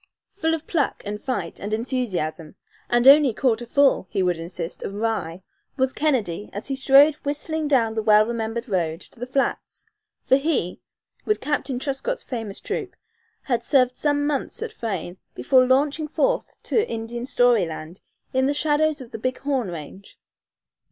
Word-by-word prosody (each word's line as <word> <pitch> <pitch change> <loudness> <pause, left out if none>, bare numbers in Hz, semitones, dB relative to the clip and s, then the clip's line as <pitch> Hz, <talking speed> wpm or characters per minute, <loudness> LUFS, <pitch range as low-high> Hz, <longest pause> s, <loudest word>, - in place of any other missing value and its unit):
Full 325 -4 0
of 320 - -8
pluck 305 -6 -1
and 210 +1 -5
fight 195 -11 -3
and 210 +2 -2
enthusiasm, 200 - -3 0.3
and 240 +1 +3
only 280 -4 +7
quarter 240 -2 0
full, 275 -6 +3
he 190 - 0
would 180 -2 0
insist, 170 +1 -6
of 195 - -5
rye, 195 -6 -2 0.3
was 260 0 +1
Kennedy 220 - -1
as 205 +7 -4
he 270 - 0
strode 275 +3 +6
whistling 300 +2 -2
down 235 -6 +2
the 220 - -1
well 215 0 +5
remembered 230 +1 -3
road 170 -5 -1
to - - -15
the 245 - -5
flats, 270 +1 -2 0.4
for 265 - +5
he, 275 - -1 0.4
with 425 - 0
Captain 285 -2 -2
Truscott's 280 - -3
famous 225 -6 -5
troop, - - -4 0.5
had 245 -4 -1
served 255 -3 +3
some 290 -1 0
months 295 +9 -2
at 455 -2 -6
Frayne 190 - -4 0.2
before 255 - +4
launching 285 +4 +2
forth - - -1
to 445 +1 +1
Indian 235 +2 -5
story 245 -8 +3
land 160 +2 -8 0.3
in 260 +1 +2
the 285 - 0
shadows 300 0 +1
of 245 - -11
the - - -6
Big 255 +3 -2
Horn 270 -5 -1
range. 170 +4 -9
245 Hz, 165 wpm, -23 LUFS, 205-285 Hz, 0.5 s, only